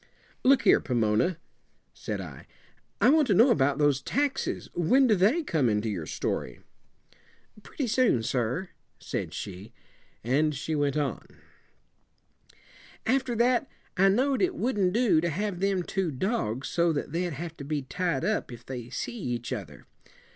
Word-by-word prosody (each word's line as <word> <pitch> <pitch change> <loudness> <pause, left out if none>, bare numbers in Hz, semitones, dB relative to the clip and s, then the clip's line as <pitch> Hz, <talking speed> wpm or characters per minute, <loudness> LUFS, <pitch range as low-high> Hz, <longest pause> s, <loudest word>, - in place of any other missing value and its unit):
"Look 270 +1 +5
here, - - +6
Pomona," 120 +7 +1 0.6
said - - -5
I, - - -9 0.5
"I - - +5
want 305 -2 +4
to 205 - +3
know 235 +7 +6
about 140 - +2
those 145 -3 +2
taxes. 280 - -1
When 250 +11 +3
do 230 - +4
they 215 - +3
come 155 - +1
into 105 +1 0
your 85 -7 -4
story?" 60 - -3 1.0
"Pretty 275 - -4
soon, 235 - +2
sir," 125 - -1 0.3
said - - -4
she, 100 +1 -7 0.5
and 145 +6 +1
she 155 +3 -3
went 145 -1 0
on: 145 -4 -2 1.8
"After 250 0 +1
that, 245 +3 +2 0.3
I 195 +1 +5
know'd 260 +6 +2
it 370 -1 +1
wouldn't 210 -7 +1
do 225 -9 +3
to 170 - 0
have 190 +3 -3
them 195 -1 +1
two 190 -1 -2
dogs 135 - -2
so 170 0 +2
that 145 - -3
they'd 175 +1 -2
have 165 +3 -6
to 140 - -7
be 145 0 -2
tied 165 +1 -2
up 215 -10 -1
if 120 - -11
they 125 -3 -7
see 185 - -4
each 120 - -3
other. 80 -8 -8
170 Hz, 155 wpm, -27 LUFS, 130-220 Hz, 1.8 s, here